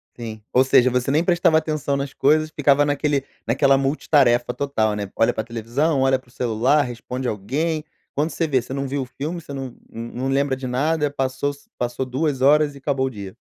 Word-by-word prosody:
Sim. 110 -2 -7
Ou 130 - +5
seja, 130 -1 +5
você 125 +1 0
nem 150 +4 +3
prestava 175 -2 +3
atenção 155 -3 -1
nas 140 0 -3
coisas, 155 +2 +2
ficava 145 -1 +3
naquele 145 -1 0 0.2
naquela 135 +3 +4
multitarefa 135 -3 +2
total, 110 -7 0
né? 105 -1 -4
Olha 115 - +3
para 110 - -2
televisão, 120 +6 -1
olha 135 0 +3
para 130 - -25
o - - -21
celular, 125 +4 +2
responde 125 0 -4
alguém. 150 +10 -2 0.3
Quando 150 +3 0
você 165 +1 -1
vê, 135 -5 +1
você 130 - -8
não 140 0 -2
viu 140 0 -2
o - - -7
filme, 150 +7 -5
você 145 -3 -10
num 135 -3 -5 0.2
num 120 +3 -5
lembra 135 0 +1
de 130 0 -6
nada, 150 +4 +1
passou 135 0 -2
se 140 - -20
passou 120 +2 -2
2 135 +1 -1
horas 145 +1 +4
e - - -10
acabou 135 -1 0
o - - -1
dia. 100 -6 -9
135 Hz, 210 wpm, -22 LUFS, 125-145 Hz, 0.3 s, Ou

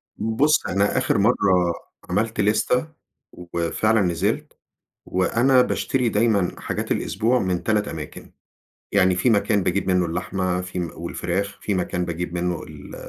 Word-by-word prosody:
بُص، 115 +8 +2
أنا 100 +2 +1
آخر - - +1
مرة 100 -2 +3 0.6
عملت 110 +4 0
لِستة، 110 +7 +1 0.4
وفعلًا 90 +5 0
نزلت، 90 +4 -1 0.5
وأنا 125 +8 +3
باشتري 125 0 0
دايمًا 105 -4 +1
حاجات - - -2
الأسبوع 115 +5 +1
من 95 -5 -1
3 105 -2 +1
أماكن، 75 -3 -8 0.6
يعني 95 -2 +4
في 90 +7 +2
مكان 105 -2 +2
باجيب 95 +3 0
منه 90 -1 +2
اللحمة، 90 +2 -2
في 90 0 -6
م 85 -2 -2
والفراخ، 95 +4 -3
في 105 - -1
مكان 90 -1 -1
باجيب 85 +1 -4
منه 90 -1 -2
ال 75 -2 -11
95 Hz, 140 wpm, -23 LUFS, 90-110 Hz, 0.6 s, يعني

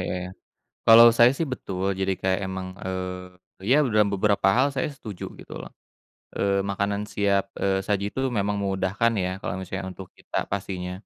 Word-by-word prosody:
ya - - -2
ya. - - -6 0.6
Kalau 115 +1 +10
saya 120 +1 +7
sih 165 - 0
betul, 95 -6 -5
jadi 95 0 +1
kayak 95 +1 +1
emang, 95 0 -5 0.2
eee, 90 0 -7
ya - - +7 0.2
dalam 105 -1 +4
beberapa 100 0 +2
hal 135 +2 +4
saya 130 - 0
setuju 105 -9 -8 0.2
gitu - - -10
loh, - - -10 0.7
eee, 100 -1 +1
makanan 100 +1 -1
siap, 100 -1 +2 0.2
eee, 95 -1 +2
saji 100 -1 0
itu 130 - -6 0.2
memang 100 0 0
memudahkan 95 +4 0
ya, 90 - -1
kalau - - -3
misalnya 95 +1 -5
untuk 95 -1 -10
kita - - -4
pastinya. 95 -2 -4
100 Hz, 175 wpm, -25 LUFS, 95-105 Hz, 0.7 s, Kalau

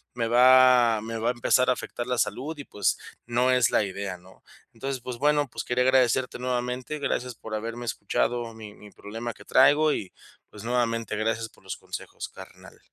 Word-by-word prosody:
me 115 -2 -1
va 125 -2 +6
me 115 +1 -5
va 115 +1 -2
a - - +3
empezar 125 +2 +2
a - - +5
afectar 120 -1 -6
la 125 -1 -1
salud 125 +9 -2
y, 145 - -7
pues, 100 -7 -1 0.3
no 120 +2 +2
es 125 -5 +4
la - - +2
idea, 100 -1 -5
¿no? 90 +2 -20 0.3
Entonces, 135 -2 -4
pues, 125 0 -6
bueno, 145 +1 +2
pues, - - -6
quería 125 +1 +1
agradecerte 130 -1 +2
nuevamente. 125 +3 -3
Gracias 125 -3 -2
por 110 -1 -7
haberme 115 +2 -5
escuchado 115 +2 -1
mi 110 -2 -10
mi 105 -1 -14
problema 115 +3 -6
que - - -15
traigo 150 +4 +5
y, 95 - -4 0.4
pues, 105 - -11
nuevamente, 115 -2 -1
gracias 115 +1 -1
por - - -24
los 95 -1 -5
consejos, - - -8
carnal. - - -14
120 Hz, 190 wpm, -26 LUFS, 110-125 Hz, 0.4 s, va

